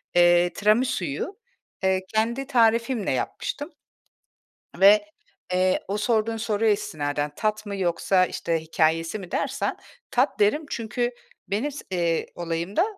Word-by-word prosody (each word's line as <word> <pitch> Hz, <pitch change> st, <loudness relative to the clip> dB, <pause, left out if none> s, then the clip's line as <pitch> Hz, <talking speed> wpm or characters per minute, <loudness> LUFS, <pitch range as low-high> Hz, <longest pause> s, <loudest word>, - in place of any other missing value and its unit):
eee, 175 Hz, 0 st, +5 dB
Tiramisuyu, 210 Hz, -, 0 dB, 0.5 s
ııı, 190 Hz, 0 st, +3 dB
kendi 235 Hz, +5 st, 0 dB
tarifimle 230 Hz, -3 st, +2 dB
yapmıştım. 290 Hz, +2 st, -3 dB, 1.1 s
Ve, 205 Hz, +2 st, +7 dB, 0.5 s
eee, 185 Hz, 0 st, +2 dB
o 200 Hz, -, -1 dB
sorduğun 225 Hz, +1 st, +1 dB
soruya 220 Hz, -1 st, +1 dB
istinaden 150 Hz, -6 st, -1 dB
tat 215 Hz, 0 st, -1 dB
mı 200 Hz, -1 st, -4 dB
yoksa 185 Hz, 0 st, +2 dB
işte 165 Hz, -2 st, -2 dB
hikâyesi 165 Hz, +3 st, 0 dB
mi 185 Hz, -4 st, -9 dB
dersen 275 Hz, 0 st, -1 dB, 0.3 s
tat 255 Hz, +4 st, +1 dB
derim. 215 Hz, +10 st, +3 dB
Çünkü 240 Hz, +1 st, -2 dB, 0.4 s
benim 225 Hz, +9 st, -1 dB
s 280 Hz, -, -8 dB
eee, 170 Hz, -3 st, 0 dB
olayımda, 170 Hz, -, -1 dB
205 Hz, 120 wpm, -25 LUFS, 175-230 Hz, 1.1 s, Ve